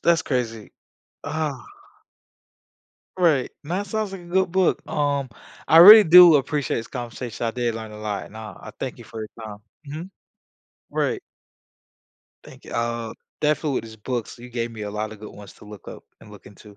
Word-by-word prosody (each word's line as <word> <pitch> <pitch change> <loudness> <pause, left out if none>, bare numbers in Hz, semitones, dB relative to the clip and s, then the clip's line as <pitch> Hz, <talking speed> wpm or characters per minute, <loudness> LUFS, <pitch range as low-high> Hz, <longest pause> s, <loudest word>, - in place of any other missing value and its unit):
that's 170 -3 +3
crazy, 115 -5 -3 0.5
ah. 155 -4 -3 1.5
Right, 160 -8 +2
and 150 - -10
that 200 +3 -2
sounds 215 -1 -3
like 190 - -7
a - - -14
good 185 0 0
book, 185 -1 +2
um, 140 -2 -1 0.4
I 160 - +6
really 210 +5 +11
do 175 -1 +9
appreciate 145 0 -1
this 115 - -4
conversation. 120 -1 -6
I - - 0
did 120 -1 -2
learn 110 -1 -7
a 105 - -10
lot, 105 -2 -5
nah, 110 -3 -9
I - - -10
thank - - -5
you - - -12
for 110 - -9
your 110 - -6 0.2
time, 105 -1 -9 0.3
mhm, 160 +6 -7 0.8
right. - - -1 1.2
Thank - - -15
you, - - -11
I'll 115 -1 -3 0.3
definitely, 150 -2 0
these 110 -1 -12
books, 120 +2 -5
you 125 +1 -11
gave 120 -1 -4
me 110 -2 -8
a 105 - -5
lot 105 +1 -4
of 105 - -13
good 105 - -9
ones 100 -2 -13
to - - -17
look 105 -1 -12
up - - -11 0.2
and 105 - -15
look 105 - -15
into. 100 +1 -15
120 Hz, 185 wpm, -23 LUFS, 110-160 Hz, 1.5 s, really